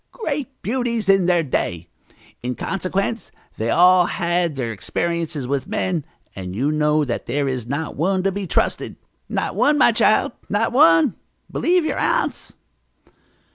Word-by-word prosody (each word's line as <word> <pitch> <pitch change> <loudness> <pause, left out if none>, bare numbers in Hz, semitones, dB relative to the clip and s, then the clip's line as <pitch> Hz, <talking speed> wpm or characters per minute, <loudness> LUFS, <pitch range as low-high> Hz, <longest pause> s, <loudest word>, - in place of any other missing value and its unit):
"Great 285 - -5
beauties 235 -2 -1
in 195 -2 +4
their 175 -2 +3
day! 85 - -2 0.5
In 125 +1 -3
consequence 195 - -2 0.3
they 110 +1 -1
all 180 +4 +5
had 170 -3 0
their 125 -4 -3
experiences 165 - -3
with 135 0 -2
men, 175 -6 -2 0.3
and 90 -1 -6
know 150 +5 +1
that 120 -3 -4
there 140 +3 0
is 130 -3 -3
not 145 +4 -3
one 185 +4 0
to 195 - +1
be 195 0 -4
trusted. - - 0 0.3
Not - - -2
one, 295 0 +3
my 265 - +5
child, 220 0 +3 0.2
not 210 +2 +1
one! 165 -10 +5 0.3
Believe 350 -1 +2
your - - -1
aunts." - - -1
170 Hz, 145 wpm, -21 LUFS, 140-205 Hz, 0.5 s, all